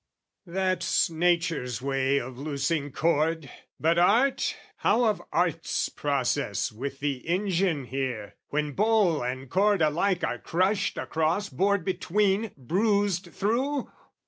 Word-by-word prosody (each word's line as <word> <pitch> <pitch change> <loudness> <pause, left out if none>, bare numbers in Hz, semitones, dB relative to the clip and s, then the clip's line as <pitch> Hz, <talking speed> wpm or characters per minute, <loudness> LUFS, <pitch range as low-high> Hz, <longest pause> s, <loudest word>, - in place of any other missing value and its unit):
That's 185 -1 +1
Nature's 165 -7 0
way 135 +1 +1
of 130 0 -7
loosing 145 0 -2
cord! 160 -1 0 0.3
but 165 +2 +3
Art, 235 +10 +3 0.2
How 245 - +2
of 215 -3 +1
Art's - - 0
process - - -1
with 135 +5 -6
the 140 -2 0
engine 180 -4 +1
here? 125 -5 -4
When 150 0 -1
bowl 205 -3 +2
and 130 +2 -4
cord 200 +6 +2
alike 175 +4 +1
are - - -1
crushed 185 +4 0
across, 165 +6 -1
Bored 200 -2 +1
between, 200 +3 +1
bruised 195 - 0
through? 260 +7 -1
170 Hz, 120 wpm, -27 LUFS, 140-200 Hz, 0.3 s, but